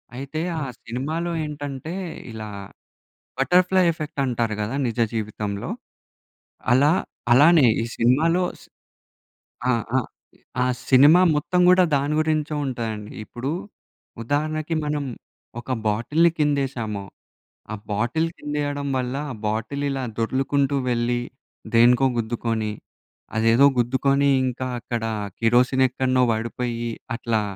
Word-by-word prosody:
అయితే 140 +4 -5 0.2
ఆ - - -2 0.2
సినిమాలో 155 +9 -3
ఏంటంటే 145 +1 -6 0.4
ఇలా 110 -1 -7 0.9
బటర్‌ఫ్లై 180 +5 +4
ఎఫెక్ట్ 155 -2 -6
అంటారు 115 -3 -1
గదా! 110 +6 -3
నిజ 115 +1 -4
జీవితంలో. 105 -2 -3 1.0
అలా 145 +5 +5 0.4
అలానే 150 0 +6 0.2
ఈ - - -1
సినిమాలో 160 +10 +3 0.2
స్ - - -15 1.1
ఆ! - - +5 0.3
ఆ! - - +5 0.6
ఆ - - +2 0.2
సినిమా 145 +6 +7 0.2
మొత్తం 180 +5 0
కూడా 185 0 +6
దాని 140 +2 0
గురించే 155 -1 0
ఉంటదండి. 110 -5 -4
ఇప్పుడు 125 +3 -5 0.7
ఉదాహరణకి 155 +4 -1
మనం 150 -1 -1 0.6
ఒక 125 +2 -6 0.2
బాటిల్ని 150 +11 +2
కిందేసాము, 135 -9 -1 0.7
ఆ - - -2 0.2
బాటిల్ 120 +10 0
కింద 150 0 -6
వేయడం 145 0 -2
వల్ల 125 +1 -2 0.2
ఆ - - -5
బాటిల్ 115 +7 -2
ఇలా 135 -1 -2
దొర్లుకుంటూ 135 +4 0
వెళ్ళి, 120 0 0 0.5
దేనికో 120 +3 +5
గుద్దుకొని, 115 -1 -1 0.7
అదేదో 115 +5 +5
గుద్దుకొని 135 +3 +2 0.2
ఇంకా 130 0 -3
అక్కడ 120 -1 -4 0.4
కిరోసిన్ 125 +3 +3
ఎక్కడిన్నో 130 0 +1
పడిపోయి, 120 +1 -3 0.3
అట్లా 115 -3 0
130 Hz, 110 wpm, -23 LUFS, 115-145 Hz, 1.1 s, సినిమా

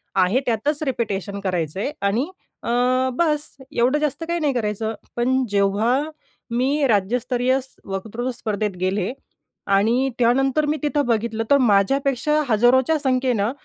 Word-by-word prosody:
आहे 190 +7 +3
त्यातच 285 +7 0
रिपिटेशन 205 - -2
करायचं 180 -2 -2
आहे 275 - -1 0.2
आणि 240 +10 0 0.4
अ, - - -4 0.4
बस 300 0 0 0.2
एवढं 250 +5 +2
जास्त 300 +2 -2
काही 340 0 -1
नाही 290 -3 +1
करायचं. 220 -1 -2 0.2
पण 260 +2 +1
जेव्हा 200 +4 +2 0.6
मी 270 +4 +1
राज्यस्तरीय 245 +5 +1 0.3
वक्तृत्व 220 +6 -4
स्पर्धेत 210 -4 -3
गेले 190 +2 0 0.6
आणि 235 +7 +2
त्यानंतर 270 +5 +2
मी 305 +1 0
तिथं 290 -1 +1
बघितलं 225 -1 0
तर 280 - +7
माझ्यापेक्षा 270 +6 +2
हजारोच्या 245 +7 +4
संख्येनं 255 -5 +1
240 Hz, 130 wpm, -22 LUFS, 210-270 Hz, 0.6 s, तर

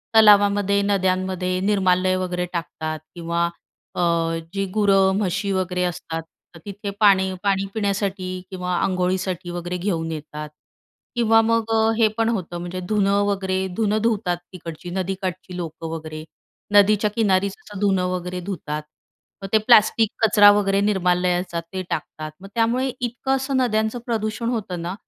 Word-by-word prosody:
तलावामध्ये, 205 -2 +5
नद्यांमध्ये 185 -2 0
निर्माल्य 185 -2 +2
वगैरे 180 -1 -2
टाकतात 160 -2 -4 0.2
किंवा 170 0 -1 0.5
अ, - - -1 0.5
जे 195 - -1
गुरं, 195 -2 +4
म्हशी 200 0 -1
वगैरे 180 -1 -1
असतात, 165 -2 -3 0.3
तर 165 - -11
तिथे 200 0 -6
पाणी, 190 -2 +4
पाणी 195 -1 +1
पिण्यासाठी 200 -3 -1 0.2
किंवा 180 -1 -2
अंघोळीसाठी 185 -1 -1
वगैरे 175 +1 -4
घेऊन 170 -3 -2
येतात 150 -1 -6 0.7
किंवा 225 -1 +4
मग 225 0 0 0.3
हे 225 -2 +5
पण 225 0 +2
होतं, 180 -6 -3
म्हणजे 175 +1 -5
धुनं 205 -1 +2
वगैरे, 190 -2 -1 0.2
धुनं 215 -1 +1
धुतात, 210 -6 0 0.2
तिकडची 165 -1 -8
नदीकाठची 185 0 -4
लोकं 165 -1 -6
वगैरे, 155 -1 -6 0.5
नदीच्या 210 +1 +5
किनारी, 200 -4 +2
असं 200 0 -9
धुनं 195 -3 +2
वगैरे 180 0 -3
धुतात. 155 -5 -4 0.6
मग - - -3
ते - - +7
प्लास्टिक 220 0 +5 0.2
कचरा 205 -2 +7
वगैरे, 195 -1 +1
निर्माल्याचा 180 -3 +1
ते 185 +3 -6
टाकतात. 155 0 -4
मग 195 - -9
त्यामुळे 240 +3 +1
इतकं 245 +2 -1
असं 270 0 -1
नद्यांचं 220 -2 +1
प्रदूषण 220 0 -2
होतं 200 -7 -3
ना. 175 +2 -3
190 Hz, 140 wpm, -22 LUFS, 180-210 Hz, 0.7 s, ते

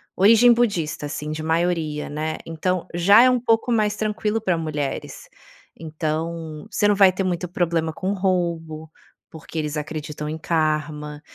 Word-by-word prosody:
origem 230 +5 +6
budista, 175 -11 -1
assim, 150 0 -5
de 155 0 -4
maioria 160 -2 -1
né. 155 +2 -3
Então 170 +2 -2
já 200 +7 +6
é 255 -1 +4
pouco 225 +2 +2
mais 210 -2 +1
tranquilo 215 0 -1
pra 180 -5 0
mulheres. 150 -3 -4 0.5
Então, 160 0 -4
você 205 - +2
não 205 - +3
vai 195 -2 +6
ter 190 +1 -3
muito 180 0 -2
problema 165 -2 0
com 190 +4 -2
roubo, 170 -5 -2 0.4
porque 160 0 -10
eles 150 0 -3
acreditam 150 0 -5
em 160 - -4
karma. 155 -2 -2
165 Hz, 150 wpm, -22 LUFS, 155-195 Hz, 0.5 s, origem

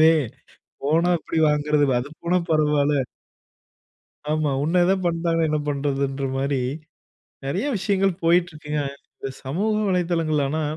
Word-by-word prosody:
இதுவே, 160 +1 +7 0.7
போனா 165 +4 +3
எப்டி 165 - -3
வாங்குறது, 150 0 +2
அது 130 - -6
போனா 175 +2 +2
பரவால்ல. 150 -2 +3 1.3
ஆமா, 155 -1 +1
உன்ன 175 +3 +2
எதா 190 - +4
பண்டாங்கண்ணா 165 -1 +1
என்ன 155 - +1
பண்றதுன்ற 140 -1 -1
மாரி, 140 +1 0 0.9
நெறைய 175 - -1
விஷயங்கள் 195 -1 +1
போய்ட்டிருக்குங்க. 165 -3 +1 0.3
இந்த 135 - -5 0.2
சமூக 185 +12 0 0.2
வலைதளங்கள் 170 -4 +1
ஆனா, 155 +3 -1
155 Hz, 115 wpm, -23 LUFS, 145-175 Hz, 1.3 s, இதுவே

